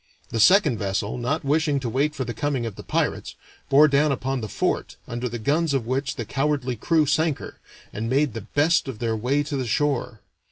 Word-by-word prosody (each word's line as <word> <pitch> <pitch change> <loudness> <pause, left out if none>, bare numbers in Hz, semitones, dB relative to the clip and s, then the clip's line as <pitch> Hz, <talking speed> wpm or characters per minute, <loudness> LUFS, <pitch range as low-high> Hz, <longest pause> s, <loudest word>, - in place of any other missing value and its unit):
The 115 - -3
second 155 - +5
vessel, 100 +1 -2
not 140 +7 -1
wishing 150 0 +2
to 125 - -3
wait 140 +6 0
for 130 - -3
the 120 - -4
coming 140 -4 -1
of 110 -4 -5
the - - -9
pirates, - - -2 0.3
bore 145 +3 +7
down 145 +1 +3
upon 135 -1 -2
the 110 - -5
fort, - - -1
under 120 +1 -3
the 120 - -4
guns 145 +6 +1
of 125 -4 -1
which 130 +2 -2
the 115 - -4
cowardly 135 0 -1
crew 155 +7 +2
sank 155 +1 +1
her, - - -10 0.3
and 115 +2 -3
made 135 -1 +2
the 115 - -5
best 145 +9 +1
of 130 -5 -5
their 115 0 -1
way 130 +6 0
to 145 0 -4
the 130 -3 -2
shore. 130 -2 -1
135 Hz, 215 wpm, -24 LUFS, 115-150 Hz, 0.3 s, bore